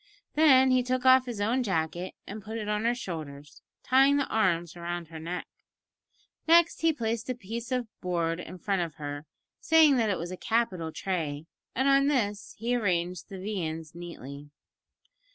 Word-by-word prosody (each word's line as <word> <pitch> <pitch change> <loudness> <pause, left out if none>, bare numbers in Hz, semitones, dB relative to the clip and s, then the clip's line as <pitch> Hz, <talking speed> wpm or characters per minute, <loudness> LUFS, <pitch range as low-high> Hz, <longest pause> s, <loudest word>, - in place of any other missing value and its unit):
Then 265 -4 +6
he 255 0 +4
took 255 +1 -2
off 260 0 +6
his 235 -4 -5
own 230 +6 +1
jacket 175 -3 -2
and 210 +2 -7
put 220 +2 -6
it 215 -2 -4
on 210 +1 -1
her 240 +1 +2
shoulders, 150 - -7 0.2
tying 270 +2 +5
the 280 - +1
arms 175 -6 +1
round 175 -1 -5
her 160 -1 -8
neck. 175 +3 -4 1.0
Next 340 +1 +5
he 325 0 +4
placed 230 -4 -3
a 255 - -1
piece 230 +3 -6
of 250 -1 0 0.2
board 170 -2 -1
in 185 - -8
front 195 +1 -1
of 165 -3 -4
her, 145 -1 -6 0.3
saying 315 -4 +5
that 225 -3 +2
it 195 - 0
was 170 +2 -5
a 185 - -6
capital 190 -9 -1
tray, 160 -5 -3 0.3
and 265 +3 +1
on 275 0 +5
this 210 -8 -1
he 235 +3 0
arranged 180 -6 -1
the 195 - -7
viands 165 -6 -4
neatly. 145 -4 -9
200 Hz, 175 wpm, -28 LUFS, 170-250 Hz, 1.0 s, Then